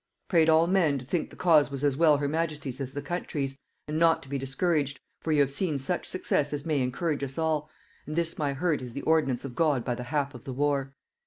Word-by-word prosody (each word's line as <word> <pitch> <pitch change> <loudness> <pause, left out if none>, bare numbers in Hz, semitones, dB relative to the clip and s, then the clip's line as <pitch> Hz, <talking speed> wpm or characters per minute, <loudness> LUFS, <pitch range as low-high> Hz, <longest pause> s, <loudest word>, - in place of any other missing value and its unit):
Prayed 165 -4 +4
all 160 +1 +5
men 170 -6 +2
to 130 - -8
think 165 +5 -1
the - - -14
cause 160 -5 +4
was 140 0 -5
as 140 -2 +2
well 155 -1 +5
her 145 0 -1
majesty's 150 -4 -2
as 135 0 -5
the 145 - -4
country's; 145 -4 -3 0.3
and 155 +1 -2
not 165 -1 +4
to 135 - -14
be 140 0 -2
discouraged; 140 0 0 0.2
for 160 - -3
you 150 -2 +4
have 140 -1 +2
seen 155 0 -1
such 140 +7 -1
success 150 -5 0
as 145 -1 -3
may 150 -4 +1
encourage 140 +4 -1
us 135 -1 -5
all; 155 -2 0 0.4
and 155 - -4
this 170 0 -1
my 145 -2 0
hurt 155 +1 0
is 125 -2 -7
the 140 - -5
ordinance 145 -6 +2
of 130 - -6
God 145 -5 +1
by 125 - 0
the 125 0 -6
hap 145 +1 -1
of 125 - -11
the 130 - -6
war. 140 0 0
145 Hz, 245 wpm, -28 LUFS, 135-160 Hz, 0.4 s, all